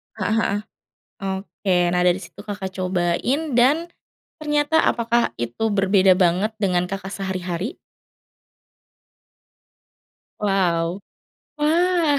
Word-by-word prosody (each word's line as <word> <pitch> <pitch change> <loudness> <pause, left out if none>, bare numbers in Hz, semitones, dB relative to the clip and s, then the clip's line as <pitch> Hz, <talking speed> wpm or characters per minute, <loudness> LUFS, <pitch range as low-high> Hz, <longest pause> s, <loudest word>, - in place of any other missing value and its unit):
Heeh 215 +1 -1
heeh, 205 -2 +1 0.6
oke 190 -1 -2 0.2
nah 180 - +2
dari 180 +1 +3
situ 180 +2 -12
Kakak 200 -2 -4
cobain 185 - 0
dan 300 +8 +3 0.5
ternyata 295 0 +1
apakah 235 0 +1
itu 120 - -3
berbeda 195 -2 +4
banget 185 +4 +2
dengan 180 -2 +2
Kakak 195 +1 -5
sehari-hari? 190 - -4 2.6
Wow. 185 -3 0 0.6
Wah, 325 0 +2
195 Hz, 95 wpm, -22 LUFS, 185-250 Hz, 2.6 s, berbeda